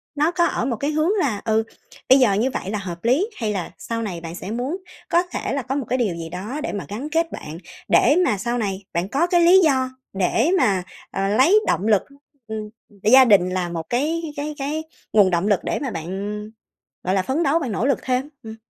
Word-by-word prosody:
nó 300 +3 +2
có 345 -1 +2
ở - - -1
một 245 -2 -1
cái 285 +6 -1
hướng 310 +4 +1
là, 240 - 0
ừ, 220 0 +2 0.5
bây 265 +1 +8
giờ 240 -6 +4
như 220 +6 +1
vậy 190 - -4
là 210 - -2
hợp 175 -3 -7
lý 290 - +2
hay 220 -3 -1
là 185 -4 -4
sau 230 0 -4
này 185 -7 -4
bạn 165 0 -7
sẽ 185 +3 -6
muốn 250 +9 -2 0.3
có 345 +1 +3
thể 360 - -4
là 280 - -1
có 260 +2 -3
một 280 -3 -2
cái 255 - +1
điều 215 -9 0
gì 165 -1 -6
đó 200 - -5
để - - -3
mà 200 - -4
gắn 240 +9 -5
kết 330 +1 0
bạn, 155 +2 -7 0.3
để 285 - +5
mà 210 - +1
sau 235 +5 -2
này 200 -4 -2
bạn 175 +3 -1
có 295 +9 +1
cái 350 -1 +3
lý 350 +3 +7
do 260 -4 +2 0.2
để 195 - +1
mà, 195 - +2 0.3
ờ, 195 0 -1
lấy 265 - +5
động 200 - +1
lực, 210 -3 +4 0.5
ừm, 215 -1 -5 0.3
gia 260 +5 +7
đình 195 -6 +5
là 185 -1 -2
một 170 -1 -4
cái 310 +7 0
cái 295 +1 -4
cái 295 +3 -3 0.3
nguồn 205 -3 +6
động 175 +2 0
lực 205 -3 +3
để - - -1
mà 275 - -3
bạn, 165 -4 -5
ừm, 210 +3 -5 0.5
gọi 185 +1 0
là, 190 - +3
phấn 265 - -1
đấu 310 +2 +2
bạn 265 -8 -3
nỗ 210 +3 -1
lực 275 - +2
thêm? 255 +2 -1
Ừm. 220 0 -8
230 Hz, 240 wpm, -22 LUFS, 195-285 Hz, 0.5 s, bây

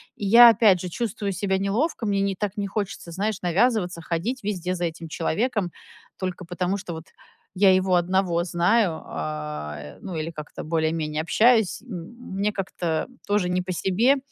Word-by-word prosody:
И 205 - -5
я 235 +4 +9
опять 205 -5 +5
же 180 - -4
чувствую 200 0 -3
себя 190 +1 0
неловко, 225 - -1
мне 200 -1 +1
не 195 -1 0
так 205 +1 -3
не 200 -1 -2
хочется, 200 -4 -4
знаешь, 205 +3 -2
навязываться, 180 -1 +1
ходить 200 +10 -3
везде 185 -3 -2
за 175 0 -1
этим 165 0 -5
человеком 195 +3 -1 0.5
только 185 -1 -4
потому, 180 +3 -1
что 175 -3 -6
вот 160 0 -8 0.5
я 190 0 +5
его 185 -1 +2
одного 175 -1 +1
знаю, 175 +1 +2
а, 75 -1 -5
э, 75 0 -10
ну 180 - -6
или 160 +1 -3
как-то 150 -2 -8
более-менее 160 -1 -1
общаюсь. 220 +4 +3
М 235 +1 -9
мне 210 +1 +1
как-то 175 -4 -2 0.2
тоже 205 -3 +1
не 180 0 +1
по 180 0 -4
себе, 225 +11 +2
185 Hz, 170 wpm, -24 LUFS, 170-205 Hz, 0.5 s, я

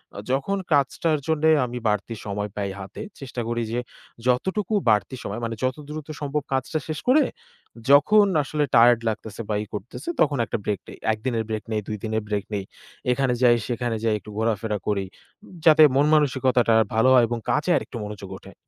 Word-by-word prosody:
অ - - -8
যখন 140 +9 0 0.2
কাজটার 150 +3 +2
জন্যে 160 0 +2 0.2
আমি 125 0 -6
বাড়তি 105 +2 -1
সময় 105 0 -3
পাই 100 -1 -2
হাতে 95 0 -8 0.2
চেষ্টা 130 -3 -5
করি 120 0 -1
যে 120 - -1 0.5
যতটুকু 190 - 0 0.2
বাড়তি 110 +4 +2
সময় 100 +3 -4
মানে 115 0 -3
যত 130 0 0
দ্রুত 150 -1 -6
সম্ভব 145 +1 -1
কাজটা 135 +4 -1
শেষ 155 -1 -3
করে 280 +5 +6 0.7
যখন 205 +10 +6 0.2
আসলে 150 +2 -1
টায়ার্ড 120 0 +7
লাগতেছে 110 0 -5
বা 105 - 0
ই - - -9
করতেছে 120 - -6
তখন 145 -2 +3
একটা - - -3
ব্রেক 105 -3 -1
নেই। - - -10 0.2
১ 110 - -5
দিনের 115 -4 0
ব্রেক 110 -1 -3
নেই, 110 -1 0
২ 105 - -3
দিনের 110 -1 -1
ব্রেক 105 -2 -1
নেই। 100 -1 -2 0.5
এখানে 130 -1 +1
যাই 120 -1 +6
সেখানে 120 -1 -2
যাই 110 -2 +2
একটু 105 - -13
ঘোরাফেরা 110 -1 0
করি 100 -2 0 0.6
যাতে 155 -1 +8
মনমানসিকতাটা 135 -5 +3 0.2
ভালো 115 +4 +4
হয় 125 -2 +6
এবং 120 +1 -2
কাজে 160 +4 +1
আরেকটু 120 - -6
মনোযোগ 100 -2 -8
ওঠে। - - -14
120 Hz, 185 wpm, -24 LUFS, 110-145 Hz, 0.7 s, যাতে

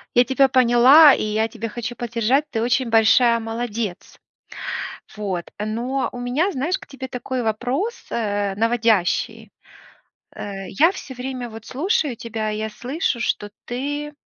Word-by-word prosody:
Я 245 +1 +6
тебя 270 +2 +4
поняла, 260 +4 +7
и - - -3
я 215 +1 0
тебя 230 0 -6
хочу 240 +2 -5
поддержать, 240 +4 0
ты 225 - -1
очень 245 +1 +1
большая 230 +1 +5
молодец. 225 -3 -5 1.0
Вот. 195 -5 -4
Но 235 +6 -2
у 245 - -8
меня, 265 +11 0
знаешь, 315 +7 -1
к - - -14
тебе 270 -1 -8
такой 250 0 -4
вопрос, 250 - -1 0.2
э, 205 -3 -1
наводящий. 220 -1 +1 0.8
Э, 195 -1 -6
я 320 - +3
всё 280 -8 -9
время 250 -1 -5
вот 220 0 -10
слушаю 310 - 0
тебя, 220 -1 -4
я 215 +1 -3
слышу, 245 +4 -2
что 205 -2 -1
ты 290 +4 -4
240 Hz, 145 wpm, -22 LUFS, 220-265 Hz, 1.0 s, поняла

